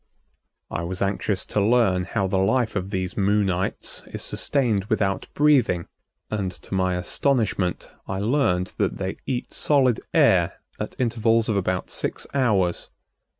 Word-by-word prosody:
I - - -2
was 90 +3 -2
anxious 100 0 -1
to 105 - 0
learn 100 -5 +3
how 100 0 -1
the 95 0 0
life 115 +4 +1
of 95 -1 -2
these 95 -2 -3
Moonites 100 -2 0
is - - -4
sustained 115 -9 +1
without 100 -3 0
breathing 130 - +3 0.5
and, 100 -4 -1
to 90 - -11
my 95 -1 +1
astonishment, 100 -1 0 0.2
I 95 - -3
learned 100 -5 +1
that - - 0
they 95 0 -3
eat 125 -2 -3
solid 130 -6 +3
air - - +4 0.3
at - - -6
intervals 115 -2 +2
of 110 - +1
about 95 -2 -1
six - - -3
hours. 105 -10 +1
100 Hz, 145 wpm, -24 LUFS, 95-120 Hz, 0.5 s, air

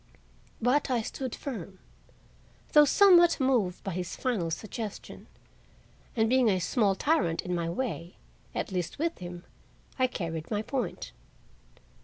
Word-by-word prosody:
But 255 +5 +2
I 240 -3 +1
stood 260 +2 -5
firm, 200 - -7 1.0
though 300 -1 +8
somewhat 345 0 +6
moved 240 -9 +1
by 195 - -3
his 180 0 -4
final 215 -10 -1
suggestion; 215 +4 -6 0.9
and, 225 -1 +3
being 250 -1 +4
a 190 - +2
small 195 +2 +1
tyrant 190 - +1
in 180 - -3
my 170 -1 -1
way, 175 - -4 0.4
at - - -3
least 180 -3 -3
with 330 +3 -2
him, 175 -1 -8 0.6
I 255 - +4
carried 165 -8 -5
my 210 -1 -1
point. 255 +2 -3
215 Hz, 135 wpm, -29 LUFS, 180-260 Hz, 1.0 s, though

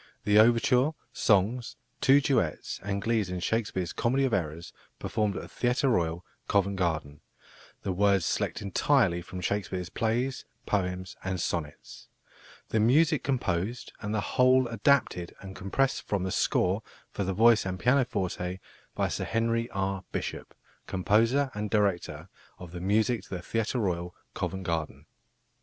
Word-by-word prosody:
"The 105 +1 +5
overture, 125 +5 +4 0.2
songs, 110 +4 +1 0.3
two 140 +2 +6
duets, 125 - 0
and 100 0 -3
glees 110 -4 +1
in 90 0 -3
Shakespeare's 95 -2 -1
Comedy 130 +3 +1
of 130 - -1
Errors, 85 -2 -2 0.2
performed 105 -2 -1
at - - -4
the - - -9
Theatre 125 +3 0
Royal, 85 -5 0 0.2
Covent 100 0 +1
Garden; 80 -5 -2 0.6
the 95 - -1
words 100 -1 +2
selected - - -1
entirely 100 -2 +2
from 90 +1 -8
Shakespeare's 90 -2 -2
Plays, 120 +3 -1 0.2
Poems, 90 -2 -2
and 95 -1 -2
Sonnets. 75 -3 -5 0.6
The 110 - +1
music 150 +7 +4
composed 120 -4 -2
and 105 - -4
the 110 -1 0
whole 130 +6 +3
adapted 115 -6 +1
and 95 -1 -9
compressed 130 +8 0
from 100 -3 -2
the 95 - -2
score 95 +4 +1 0.3
for 100 - -2
the 95 0 -2
voice 115 +2 +5
and 95 -1 -3
pianoforte 100 -8 0 0.4
by - - +1
Sir - - -3
Henry 115 +1 0
R. 95 -1 -2
Bishop, - - -5 0.3
Composer 115 +9 +2
and 105 0 -3
Director 90 -6 0 0.3
of 90 -2 -10
the 90 0 -7
Music 110 +5 +2
to - - -19
the 90 - -6
Theatre 115 +4 -1
Royal, 90 -5 -2 0.2
Covent 95 +2 -3
Garden." 80 -3 -3
100 Hz, 150 wpm, -28 LUFS, 90-115 Hz, 0.6 s, two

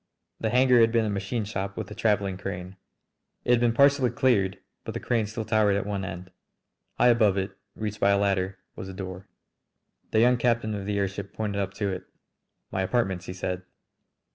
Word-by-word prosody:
The 110 - 0
hangar 125 +1 +5
had 115 0 +5
been 115 -1 +2
a 105 - -1
machine 100 +3 -2
shop 95 -1 -4
with - - -5
a - - -4
travelling 105 -3 +1
crane. 90 +1 -6 0.7
It - - +2
had 120 - +5
been 120 -1 +3
partially 140 +1 +4
cleared 105 -9 +2 0.3
but - - -6
the - - -2
crane 115 -3 0
still 110 +1 -5
towered 110 -2 +3
at 100 - -1
one 100 -1 -2
end. 90 0 -7 0.7
High 125 - +5
above 110 -5 +4
it, 95 0 -2 0.2
reached 105 -1 -4
by 100 - +4
a 100 - +4
ladder, 95 -1 0 0.2
was 95 - -7
a - - -7
door. 95 -1 -7 0.8
The 110 - +2
young 125 +2 +5
captain 115 -2 +1
of 100 -1 -4
the 105 -1 0
airship 100 0 -3
pointed 100 -2 -2
up 95 -1 -4
to 100 -2 -1
it. 95 - -5 0.7
"My 95 - -1
apartments!" 95 -3 0
he - - -4
said. 90 0 -3
100 Hz, 200 wpm, -27 LUFS, 95-115 Hz, 0.8 s, hangar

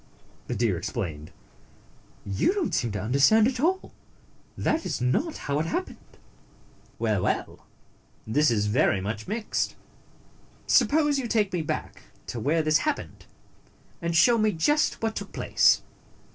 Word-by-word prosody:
the - - -3
deer - - +1
explained. 75 -2 -5 1.0
"You 100 - +1
don't 390 -5 -1
seem 120 -3 0
to 105 - -3
understand 140 - +4
at 255 -1 -2
all; 365 +7 0 0.6
that 320 +1 0
is - - -3
not 130 - 0
how 140 +1 -2
it 160 - -1
happened." 360 - -5 0.8
"Well, 110 -4 0
well! - - -3 0.6
This 150 +7 +2
is 105 -3 +1
very 105 -2 +2
much 105 +3 -5
mixed. 215 +2 -2 0.9
Suppose 295 -1 +3
you 250 - -3
take 210 -4 +1
me 175 - 0
back 155 - -5 0.2
to 120 - -5
where 155 +8 +1
this 155 0 +3
hap 300 -2 0
pened, - - -12 0.7
and 170 0 -2
show 235 +7 +5
me 215 -1 +2
just 295 - +1
what 225 -1 -1
took - - -6
place." - - +3
165 Hz, 145 wpm, -26 LUFS, -, 1.0 s, show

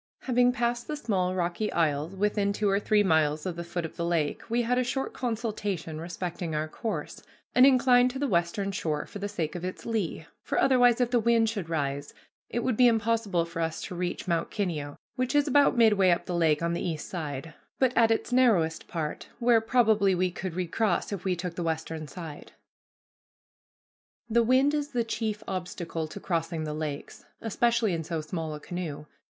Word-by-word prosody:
Having 245 -1 +3
passed 240 -1 -1
the 305 - -2
small 185 -8 0
rocky 180 +4 -1
isles 155 +1 0
within 205 0 +1
two 210 +1 0
or 195 0 +3
three 210 0 +3
miles 155 -4 +2
of 180 -3 -2
the 170 - -5
foot 170 0 -4
of 160 - -9
the 170 - -2
lake, 165 -4 0
we 240 +1 +1
had 250 +2 +1
a - - +2
short 265 +2 -2
consultation 210 -9 -3
respecting 170 -1 -4
our 155 +1 -1
course, 220 +7 -5 0.3
and 255 +2 +7
inclined 250 -1 +5
to 260 - -6
the 285 +1 0
western 185 +1 0
shore 155 -6 -2
for 205 - -9
the 205 +1 -3
sake 165 -7 -3
of 175 - -6
its 185 0 -5
lee; 205 -8 -2 0.2
for - - -1
otherwise, 245 -3 +5
if 245 -1 +1
the 245 - +4
wind 230 0 +3
should 200 -7 -4
rise, 145 -3 -2 0.3
it 240 - -2
would 255 - +1
be 250 +2 +6
impossible 220 -6 +1
for 170 0 -5
us 165 -1 -2
to - - -6
reach 180 +1 -3
Mount 170 -2 0
Kineo, 155 -8 -3 0.2
which 255 +2 -1
is 290 0 +4
about 285 -1 +4
midway 210 -5 +5
up 175 -1 +2
the 180 - -4
lake 165 -2 +2
on 170 0 0
the 170 - -2
east 160 -4 -3
side, 155 -2 -5 0.2
but 260 -2 +2
at 225 -1 +5
its 225 +2 0
narrowest 205 -11 +3
part, 155 -3 -4
where 235 -1 +4
probably 220 -5 +3
we 180 0 +1
could 180 -1 -5
recross 185 +2 0
if 195 - -5
we 185 -2 +1
took 175 0 -4
the 175 - -5
western 160 -1 -3
side. 160 -2 -9 1.7
The 235 +1 +3
wind 260 +5 +4
is 290 -1 -2
the 240 -1 +1
chief 220 -1 -3
obstacle 175 -3 -4
to 180 - -8
crossing 165 -3 -2
the 150 -1 -3
lakes, 150 -2 -5
especially 230 -1 +1
in 165 -1 -2
so 160 0 -3
small 155 0 -4
a - - -8
canoe. 155 -3 -5
185 Hz, 200 wpm, -28 LUFS, 165-230 Hz, 1.7 s, and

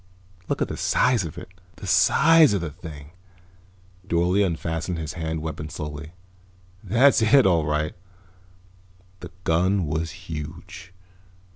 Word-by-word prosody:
"Look - - 0
at - - -3
the - - -6
size 125 -5 +2
of 80 - -8
it. 90 - -9 0.3
The - - -10
size 160 -3 +5
of 100 - 0
the 80 -3 -4
thing." 75 -1 -11 1.0
Dorle 90 +3 +2
unfastened 80 -1 -2
his 80 -1 -5
hand 80 -2 -4
weapon 80 -1 -5
slowly. 75 +1 -7 0.7
"That's 130 +2 +4
it, 115 +4 +5
all 85 -5 +2
right." 75 0 -1 1.3
The - - -9
gun 90 +3 +1
was 80 +2 -2
huge. 85 +5 -9
85 Hz, 130 wpm, -24 LUFS, 80-95 Hz, 1.3 s, size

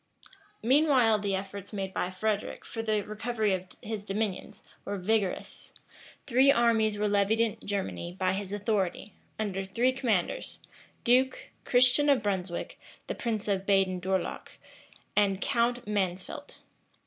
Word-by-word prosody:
Meanwhile 255 -4 +4
the 200 -1 -1
efforts 195 +1 -6
made 195 -2 -4
by 180 - -1
Frederic 205 +3 -2
for 225 - -5
the 215 -2 +1
recovery 215 0 -1
of 185 0 -3 0.2
his 215 -2 -4
dominions, 205 -1 -3 0.2
were 200 0 -3
vigorous. 200 0 -1 0.5
Three 265 +2 +5
armies 225 -4 +3
were 210 0 +1
levied 205 +2 +2
in 230 -2 +1
Germany 190 -3 -3
by 185 -1 +2
his 195 0 -4
authority, 205 -1 -1 0.2
under 195 -3 -2
three 230 +7 +1
commanders, 250 - -1 0.5
Duke, 260 +2 +2 0.2
Christian 255 +4 +4
of 275 -5 +4
Brunswick, 190 -3 -3 0.3
the - - -3
prince 220 -4 -2
of 195 -1 -1
Baden 190 -2 +3
Dourlach, 190 +1 -2 0.6
and 200 -2 +3
Count 240 +3 +1
Mansfeldt. 200 - -3
210 Hz, 135 wpm, -29 LUFS, 195-230 Hz, 0.6 s, Three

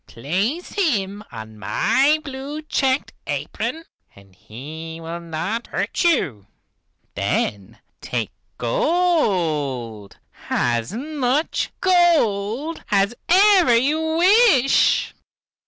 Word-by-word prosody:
Place 195 - -2
him 210 - -1
on 110 -1 -10
my 275 - +2
blue 280 +2 -6
checked 270 -2 0
apron 325 - -4 0.3
and 100 -1 -19
he 160 - -9
will 165 +1 -6
not 170 +8 -4
hurt - - -2
you. 145 - +1 0.7
Then 100 +2 -2 0.2
take 115 -7 -3 0.3
gold, 150 - 0 0.3
as 120 +3 0
much 280 +4 -1
gold 315 - +1
as 200 0 +2 0.2
ever 370 - +5
you 315 +6 +1
wish." 360 - +4
225 Hz, 90 wpm, -21 LUFS, -, 0.7 s, ever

